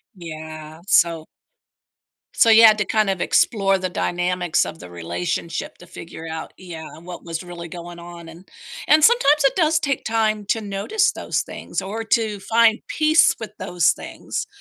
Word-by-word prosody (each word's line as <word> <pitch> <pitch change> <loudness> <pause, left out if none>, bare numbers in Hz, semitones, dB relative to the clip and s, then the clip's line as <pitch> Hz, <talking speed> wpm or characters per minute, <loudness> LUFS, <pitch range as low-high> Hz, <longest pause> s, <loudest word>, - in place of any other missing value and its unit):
Yeah, 155 -2 -9
so 165 -4 +3 1.1
So, 230 - +4
you 225 +1 +8
had 215 -1 +8
to 210 - 0
kinda 195 -4 0
explore 195 -3 +2
the 185 -1 -3
dynamics 180 -1 -1
of 160 - -8
the 90 - -11
relationship 90 - -4
to 175 - -14
figure 165 -1 -10
out 160 0 -7
yeah, 170 -4 -9
and 165 - -15
what 175 -1 -9
was 165 +1 -5
really 175 -1 -8
going 175 +1 -9
on 170 -1 -11
and 170 +4 -14 0.4
and 305 0 +5
sometimes 300 -11 +5
it 275 - +3
does 320 -2 +2
take 280 -3 -2
time 215 -2 0
to 225 - 0
notice 210 - 0
those - - -2
things - - -6
or 215 +4 -5
to 220 -2 0
find 225 +3 +3
peace 315 +3 +3
with 220 -2 -7
those 175 -3 +1
things, - - -6
185 Hz, 170 wpm, -21 LUFS, 170-225 Hz, 1.1 s, you